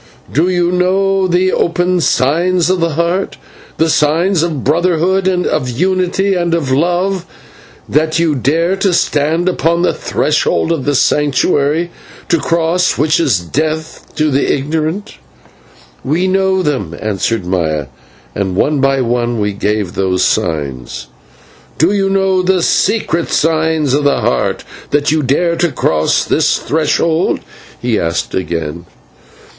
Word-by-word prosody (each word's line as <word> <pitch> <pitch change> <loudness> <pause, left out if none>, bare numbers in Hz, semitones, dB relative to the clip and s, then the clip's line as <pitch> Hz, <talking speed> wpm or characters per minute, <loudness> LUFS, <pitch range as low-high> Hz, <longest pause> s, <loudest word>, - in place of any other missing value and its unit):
"Do 160 +6 +2
you 175 -1 +1
know 190 +1 +1
the 180 +1 +2
open 175 +1 +1
signs 170 +6 +1
of 185 - 0
the 165 -1 0
Heart, 170 +4 -1 0.4
the 160 - +2
signs 160 +4 +2
of 160 -6 -2
Brotherhood, 175 +5 +1
of 180 -8 0
Unity, 185 +7 0
and 175 -2 0
of 145 -6 -2
Love, 175 +6 0 0.6
that 155 +2 +1
you 165 -2 +2
dare 160 +8 +1
to 190 -2 +1
stand 160 +3 +1
upon 170 -1 +1
the - - +2
threshold 85 - 0
of 160 -6 -2
the 145 -1 +1
Sanctuary, 150 +4 +1 0.4
to 170 - +2
cross 170 +3 +1
which 155 +2 +2
is 130 - +2
death 155 - -3
to 155 -1 +1
the 140 +1 +1
ignorant?" 160 +8 -2 0.9
"We 165 +7 0
know 190 0 +1
them," 105 - -2
answered 105 0 -2
Maya. 80 -5 -1 0.5
And 95 -2 -2
one 145 +8 +1
by 135 0 +2
one 120 -1 -1
we 105 -1 -1
gave 105 -2 -2
those 95 -1 0
signs. 70 -6 -2 0.7
"Do 165 +5 +3
you 195 -1 +1
know 190 -1 +2
the 185 -1 +1
secret 170 -7 +1
signs 160 -3 +1
of 145 +1 +1
the 140 - +2
Heart, - - 0 0.3
that 145 0 +1
you 155 0 +1
dare 170 +6 +1
to 170 -1 +1
cross 80 - +1
this - - +1
threshold?" 160 +2 0 0.4
he 120 -3 0
asked 85 0 -2
again. 85 -2 -4
160 Hz, 140 wpm, -14 LUFS, 130-180 Hz, 0.9 s, Do